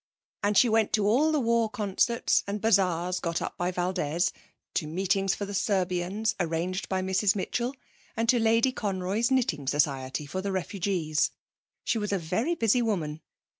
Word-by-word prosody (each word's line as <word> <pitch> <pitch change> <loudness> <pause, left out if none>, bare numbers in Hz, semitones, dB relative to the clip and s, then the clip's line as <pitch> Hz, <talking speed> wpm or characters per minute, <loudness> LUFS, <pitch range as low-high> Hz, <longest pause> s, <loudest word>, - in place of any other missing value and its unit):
And 205 0 +1
she 250 - +6
went 220 -1 +2
to 210 -2 +2
all 265 +10 +3
the 305 - +2
war 230 -2 +2
concerts 220 +1 +1
and 205 +1 -2
bazaars 185 -4 +2
got 170 -1 -2
up - - -4
by 175 0 -1
Valdez, 175 -2 -1 0.4
to 155 - -1
meetings 190 +3 0
for 205 - -4
the 200 - -7
Serbians 190 +2 0
arranged 175 +2 -2
by 185 -1 0
Mrs 190 +2 +2
Mitchell 240 +6 -2 0.4
and 225 +1 0
to 245 0 +4
Lady 230 +3 +3
Conroy's 200 0 -1
Knitting 225 - 0
Society 135 -1 0
for 185 +6 -4
the 200 +1 -2
Refugees. 185 -4 0 0.5
She 230 - 0
was 210 -1 -2
a 200 - +2
very 205 - -1
busy 230 -3 +2
woman. 165 -9 -2
195 Hz, 170 wpm, -27 LUFS, 175-225 Hz, 0.5 s, she